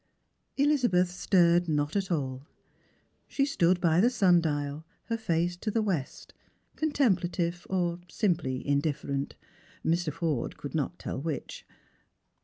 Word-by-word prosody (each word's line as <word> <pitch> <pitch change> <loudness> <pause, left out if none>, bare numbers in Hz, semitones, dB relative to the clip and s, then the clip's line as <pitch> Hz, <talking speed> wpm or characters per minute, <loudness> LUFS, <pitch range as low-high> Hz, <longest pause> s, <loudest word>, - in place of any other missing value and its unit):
Elizabeth 245 -12 +3
stirred 175 -2 +3
not 150 +1 0
at 195 -2 -1
all. 135 -3 -2 0.8
She 275 - +1
stood 180 -10 +2
by 170 0 +3
the 240 - +5
sun 185 -8 +4
dial, 145 -1 -2 0.3
her 230 - +1
face 175 -5 0
to 215 - -3
the 220 +1 +1
west, 170 -10 -3 0.4
contemplative, 180 - 0
or 175 -2 0
simply 165 - 0
indiff'erent, 140 -1 -1 0.5
Mr. 170 -1 +1
Forde 150 -6 -2
could 145 - -7
not 160 +3 -2
tell - - -5
which. 160 -1 -5
175 Hz, 125 wpm, -29 LUFS, 150-190 Hz, 0.8 s, the